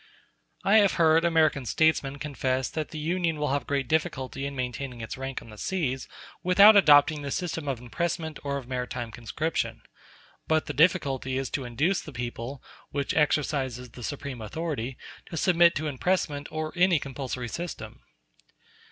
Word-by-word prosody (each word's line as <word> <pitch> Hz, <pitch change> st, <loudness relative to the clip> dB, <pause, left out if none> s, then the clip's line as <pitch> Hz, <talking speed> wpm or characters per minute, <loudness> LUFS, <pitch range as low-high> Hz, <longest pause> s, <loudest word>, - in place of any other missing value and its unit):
I 200 Hz, +3 st, +5 dB
have 200 Hz, -3 st, +5 dB
heard 165 Hz, 0 st, +4 dB
American 160 Hz, -5 st, +3 dB
statesmen 145 Hz, -2 st, +2 dB
confess 130 Hz, -3 st, -1 dB
that 155 Hz, -1 st, -3 dB
the 155 Hz, -, -7 dB
Union 165 Hz, +1 st, 0 dB
will 150 Hz, -1 st, -1 dB
have 140 Hz, -2 st, -1 dB
great 140 Hz, -2 st, -1 dB
difficulty 135 Hz, -2 st, -1 dB
in 140 Hz, -, -6 dB
maintaining 125 Hz, 0 st, -4 dB
its 115 Hz, -, -5 dB
rank 135 Hz, 0 st, -5 dB
on 115 Hz, -, -13 dB
the 105 Hz, -, -12 dB
seas 140 Hz, -9 st, -2 dB, 0.3 s
without 200 Hz, +4 st, +7 dB
adopting 150 Hz, -5 st, +6 dB
the 140 Hz, -, -4 dB
system 165 Hz, 0 st, -3 dB
of 135 Hz, -4 st, -1 dB
impressment 160 Hz, +5 st, -3 dB
or 140 Hz, -1 st, -2 dB
of 130 Hz, -3 st, -8 dB
maritime 125 Hz, -2 st, -4 dB
conscription; 115 Hz, -1 st, -3 dB, 0.6 s
but 160 Hz, 0 st, +2 dB
the 145 Hz, -, -4 dB
difficulty 135 Hz, -4 st, +2 dB
is 135 Hz, -1 st, -3 dB
to 135 Hz, -, -2 dB
induce 150 Hz, +11 st, 0 dB
the 150 Hz, -, -10 dB
people, 120 Hz, +2 st, -5 dB, 0.3 s
which 140 Hz, -1 st, -2 dB
exercises 135 Hz, -5 st, 0 dB
the 125 Hz, -, -11 dB
supreme 140 Hz, -1 st, -5 dB
authority, 135 Hz, 0 st, -4 dB, 0.3 s
to 165 Hz, -, -6 dB
submit 170 Hz, -1 st, +4 dB
to 155 Hz, -, -2 dB
impressment 150 Hz, 0 st, -1 dB
or 155 Hz, 0 st, -4 dB
any 180 Hz, -1 st, +4 dB
compulsory 130 Hz, -3 st, -4 dB
system. 170 Hz, +8 st, -6 dB
145 Hz, 160 wpm, -27 LUFS, 130-160 Hz, 0.6 s, without